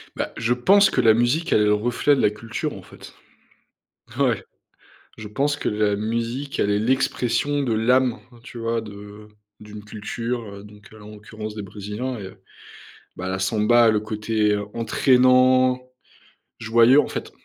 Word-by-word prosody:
Bah, -, -, -3 dB
je 115 Hz, +1 st, +1 dB
pense 195 Hz, +11 st, +4 dB
que -, -, 0 dB
la 110 Hz, -, +5 dB
musique, 120 Hz, +9 st, 0 dB
elle 105 Hz, -, +4 dB
est -, -, +3 dB
le 105 Hz, -, +3 dB
reflet 120 Hz, +6 st, +1 dB
de -, -, -1 dB
la -, -, +4 dB
culture, 110 Hz, +1 st, -5 dB
en -, -, -11 dB
fait. -, -, -14 dB, 1.1 s
Ouais. -, -, +1 dB, 0.7 s
Je 110 Hz, -, -8 dB
pense 140 Hz, +7 st, -1 dB
que -, -, -3 dB
la 105 Hz, -1 st, 0 dB
musique, 115 Hz, +6 st, -3 dB
elle 100 Hz, -, +1 dB
est 105 Hz, -, +1 dB
l'expression 130 Hz, +3 st, 0 dB
de 120 Hz, -4 st, -1 dB
l'âme, 125 Hz, +2 st, +2 dB, 0.2 s
tu 120 Hz, -, -11 dB
vois, 115 Hz, 0 st, -2 dB
de 105 Hz, 0 st, -11 dB, 0.3 s
d'une 105 Hz, 0 st, -11 dB
culture, 115 Hz, +3 st, -5 dB
heu, 100 Hz, 0 st, -11 dB
donc, 105 Hz, 0 st, -16 dB
heu, 110 Hz, -, -14 dB
là, 105 Hz, -, -14 dB
en 105 Hz, -, -11 dB
l'occurrence, 110 Hz, 0 st, -9 dB
des 105 Hz, -, -5 dB
brésiliens 105 Hz, +6 st, -6 dB
et 95 Hz, -2 st, -8 dB, 0.9 s
bah, 95 Hz, 0 st, -5 dB
la 95 Hz, -, -3 dB
samba, 110 Hz, +4 st, +3 dB
le 105 Hz, -1 st, +1 dB
côté 110 Hz, -1 st, -1 dB, 0.2 s
entraînant, 130 Hz, +2 st, +3 dB, 0.8 s
joyeux, 115 Hz, +5 st, +5 dB
en -, -, -2 dB
fait. -, -, -6 dB
115 Hz, 170 wpm, -22 LUFS, 105-125 Hz, 1.1 s, la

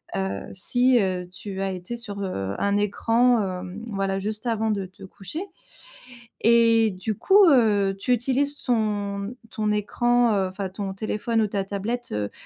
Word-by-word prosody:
Heu, 95 Hz, +1 st, -2 dB
si, 245 Hz, +6 st, +3 dB
heu, 185 Hz, -2 st, -2 dB
tu 190 Hz, +1 st, -6 dB
as 195 Hz, 0 st, -1 dB
été 185 Hz, +6 st, -6 dB
sur, 205 Hz, -4 st, -7 dB
heu, 95 Hz, -, -3 dB
un 200 Hz, 0 st, +1 dB
écran, 230 Hz, +4 st, +2 dB, 0.2 s
hem, 185 Hz, +4 st, -8 dB
voilà, 195 Hz, -1 st, -1 dB
juste 215 Hz, +4 st, -4 dB
avant 220 Hz, -1 st, 0 dB
de 200 Hz, -2 st, -2 dB
te 185 Hz, -, -16 dB
coucher 195 Hz, -, -7 dB, 1.0 s
et 230 Hz, -1 st, +5 dB
du 185 Hz, +4 st, -4 dB
coup, 395 Hz, -, +5 dB
heu, 205 Hz, -7 st, +3 dB
tu 250 Hz, +5 st, +1 dB
utilises 270 Hz, +4 st, 0 dB
ton 210 Hz, -2 st, -1 dB, 0.2 s
ton 215 Hz, -1 st, -1 dB
écran, 240 Hz, +3 st, +2 dB
heu, 190 Hz, -1 st, +1 dB
enfin 190 Hz, 0 st, -5 dB
ton 195 Hz, 0 st, -5 dB
téléphone 220 Hz, +3 st, -1 dB
ou 215 Hz, -, +2 dB
ta 200 Hz, -1 st, -2 dB
tablette, 210 Hz, +5 st, -4 dB
heu, 105 Hz, -1 st, -2 dB
210 Hz, 165 wpm, -24 LUFS, 195-235 Hz, 1.0 s, et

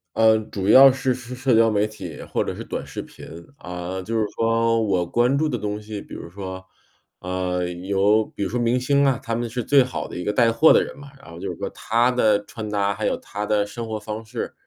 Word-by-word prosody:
呃， 110 Hz, 0 st, +5 dB
主 100 Hz, -3 st, -5 dB
要 135 Hz, +4 st, +9 dB
是 130 Hz, 0 st, -1 dB
是 125 Hz, 0 st, -9 dB
社 130 Hz, -1 st, +1 dB
交 115 Hz, 0 st, +5 dB
媒 105 Hz, 0 st, +1 dB
体 90 Hz, -7 st, -9 dB
或 -, -, -2 dB
者 -, -, -4 dB
是 -, -, -7 dB
短 -, -, -5 dB
视 -, -, -6 dB
频。 -, -, -13 dB, 0.3 s
啊， 90 Hz, +1 st, -6 dB
就 115 Hz, +3 st, -4 dB
是 110 Hz, -, +1 dB
说 115 Hz, 0 st, +2 dB
我 95 Hz, -4 st, +1 dB
关 120 Hz, +7 st, +2 dB
注 155 Hz, +2 st, +1 dB
的 125 Hz, -, -1 dB
东 105 Hz, 0 st, -4 dB
西， 105 Hz, -1 st, -7 dB
比 -, -, -12 dB
如 -, -, -8 dB
说， 95 Hz, 0 st, -7 dB, 0.6 s
呃， 90 Hz, -1 st, -2 dB
有 100 Hz, +4 st, +1 dB
比 100 Hz, -, -6 dB
如 95 Hz, -, -2 dB
说 125 Hz, -, -2 dB
明 120 Hz, +1 st, +2 dB
星 140 Hz, +3 st, +2 dB
啊， 135 Hz, -3 st, +2 dB
他 115 Hz, -, -3 dB
们 120 Hz, 0 st, -2 dB
是 125 Hz, +1 st, -3 dB
最 140 Hz, +2 st, +5 dB
好 125 Hz, -, -5 dB
的 -, -, -9 dB
一 90 Hz, -, -4 dB
个 105 Hz, -, 0 dB
带 115 Hz, +2 st, +3 dB
货 155 Hz, +8 st, +5 dB
的 -, -, +5 dB
人 -, -, -8 dB
嘛。 140 Hz, 0 st, -11 dB
然 135 Hz, -, -14 dB
后 85 Hz, -, -10 dB
就 -, -, -4 dB
是 -, -, -9 dB
说 -, -, -4 dB
他 120 Hz, +3 st, +1 dB
的 110 Hz, -4 st, +2 dB
穿 110 Hz, -2 st, -7 dB
搭， 100 Hz, -1 st, 0 dB
还 -, -, -2 dB
有 -, -, 0 dB
他 105 Hz, +1 st, -6 dB
的 105 Hz, -1 st, +2 dB
生 115 Hz, +3 st, -7 dB
活 110 Hz, -1 st, -4 dB
方 110 Hz, +1 st, -6 dB
式， 115 Hz, +2 st, -5 dB
110 Hz, 270 characters per minute, -23 LUFS, 100-120 Hz, 0.6 s, 要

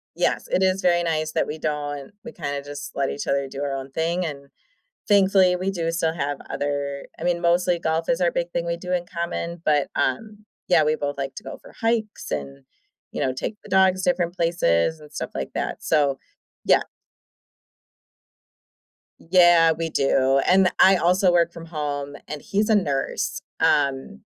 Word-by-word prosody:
Yes, -, -, 0 dB
it -, -, +1 dB
is 190 Hz, +1 st, +2 dB
very 175 Hz, -1 st, +3 dB
nice 155 Hz, -2 st, -1 dB
that -, -, 0 dB
we 150 Hz, -, -5 dB
don't 145 Hz, 0 st, -4 dB
we 235 Hz, -, -7 dB
kinda 145 Hz, -4 st, -4 dB
just 145 Hz, 0 st, -7 dB
let 135 Hz, -1 st, 0 dB
each 145 Hz, -, -5 dB
other 140 Hz, 0 st, 0 dB
do 135 Hz, +1 st, -6 dB
our 140 Hz, -1 st, -2 dB
own 135 Hz, 0 st, -6 dB
thing, 170 Hz, +4 st, -1 dB
and, 140 Hz, -3 st, -7 dB, 0.6 s
thankfully, 190 Hz, -2 st, +4 dB
we 185 Hz, +2 st, -1 dB
do 170 Hz, -3 st, -2 dB
still 165 Hz, -1 st, 0 dB
have 145 Hz, -3 st, -2 dB
other 140 Hz, -1 st, -3 dB
I -, -, -6 dB
mean, 175 Hz, -1 st, 0 dB
mostly 175 Hz, 0 st, +2 dB
golf 160 Hz, 0 st, -1 dB
is 250 Hz, -, +1 dB
our 175 Hz, -1 st, +3 dB
big 175 Hz, 0 st, -2 dB
thing 170 Hz, 0 st, -2 dB
we 170 Hz, 0 st, -2 dB
do 180 Hz, +1 st, -7 dB
in 175 Hz, -1 st, 0 dB
common, 170 Hz, 0 st, -4 dB
but, 150 Hz, -2 st, +2 dB
um 210 Hz, -, -2 dB, 0.2 s
Yeah, 170 Hz, -3 st, +5 dB
we 155 Hz, +1 st, +2 dB
both 145 Hz, -2 st, -4 dB
like 135 Hz, -1 st, -4 dB
to 210 Hz, -, -8 dB
go -, -, -8 dB
for -, -, -15 dB
hikes 225 Hz, -2 st, -1 dB
and, 70 Hz, -2 st, -5 dB, 0.5 s
you -, -, -3 dB
know, 130 Hz, -, +1 dB
take 130 Hz, +11 st, -4 dB
the -, -, -13 dB
dogs 190 Hz, 0 st, +3 dB
different 175 Hz, -1 st, 0 dB
places 160 Hz, -, +1 dB
and 150 Hz, -1 st, -14 dB
stuff -, -, -5 dB
like 65 Hz, -, -4 dB
that, -, -, -3 dB
so 140 Hz, -4 st, +2 dB, 0.5 s
Yeah. -, -, +5 dB, 2.4 s
Yeah, 175 Hz, -2 st, +5 dB
we 165 Hz, 0 st, -3 dB
do, 135 Hz, -1 st, +2 dB
and 185 Hz, 0 st, +5 dB
I 190 Hz, +1 st, +7 dB
also 180 Hz, +1 st, +3 dB
work 170 Hz, -1 st, +3 dB
from 165 Hz, 0 st, -10 dB
home, 145 Hz, -3 st, -4 dB
and 150 Hz, -1 st, -5 dB
he's 210 Hz, +7 st, -1 dB
a 220 Hz, -, +4 dB
nurse, 140 Hz, -9 st, -1 dB, 0.2 s
um, 135 Hz, -, +1 dB
165 Hz, 185 wpm, -23 LUFS, 145-180 Hz, 2.4 s, I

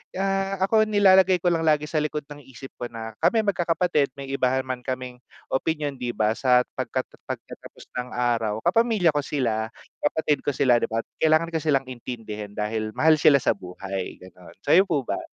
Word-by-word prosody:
ah, 195 Hz, 0 st, 0 dB
ako 215 Hz, +2 st, +3 dB
nilalagay 190 Hz, -3 st, +5 dB
ko 175 Hz, -, +3 dB
lang 165 Hz, -1 st, 0 dB
lagi 150 Hz, -1 st, +3 dB
sa 155 Hz, +1 st, -1 dB
likod 150 Hz, 0 st, -2 dB
ng 145 Hz, -, -9 dB
isip 130 Hz, +1 st, -11 dB
ko 120 Hz, -, -3 dB
na 115 Hz, -1 st, -7 dB
kami 225 Hz, -1 st, +3 dB
magkakapatid 175 Hz, -6 st, +1 dB
may 135 Hz, -1 st, -7 dB
iba 135 Hz, -2 st, +1 dB
naman 130 Hz, -1 st, -2 dB
kaming 130 Hz, -1 st, -4 dB, 0.3 s
opinyon 145 Hz, -1 st, -1 dB
'di 120 Hz, -1 st, -3 dB
ba 105 Hz, 0 st, +2 dB
sa 125 Hz, +2 st, +3 dB, 0.2 s
pagkat 130 Hz, +1 st, -1 dB, 0.2 s
pagkatapos -, -, -9 dB, 0.2 s
ng 125 Hz, 0 st, -5 dB
araw, 115 Hz, -3 st, 0 dB
kapamilya 210 Hz, -2 st, +3 dB
ko 145 Hz, -, 0 dB
sila, 115 Hz, -6 st, -1 dB, 0.3 s
kapatid 150 Hz, -1 st, 0 dB
ko 145 Hz, -, +1 dB
sila 125 Hz, -3 st, +4 dB
'di -, -, -1 dB
ba 115 Hz, +1 st, -2 dB, 0.2 s
kailangan 160 Hz, +1 st, +3 dB
ko 160 Hz, -, -1 dB
silang 145 Hz, -3 st, +1 dB
intindihin 110 Hz, -4 st, -7 dB
dahil 110 Hz, 0 st, -3 dB
mahal 155 Hz, -1 st, +4 dB
sila 145 Hz, -, +6 dB
sa -, -, +3 dB
buhay, 95 Hz, +1 st, -6 dB
ganun, 90 Hz, -1 st, -15 dB
sayo 190 Hz, +3 st, +5 dB
po 150 Hz, -7 st, 0 dB
ba? -, -, -3 dB
140 Hz, 185 wpm, -24 LUFS, 120-165 Hz, 0.3 s, sila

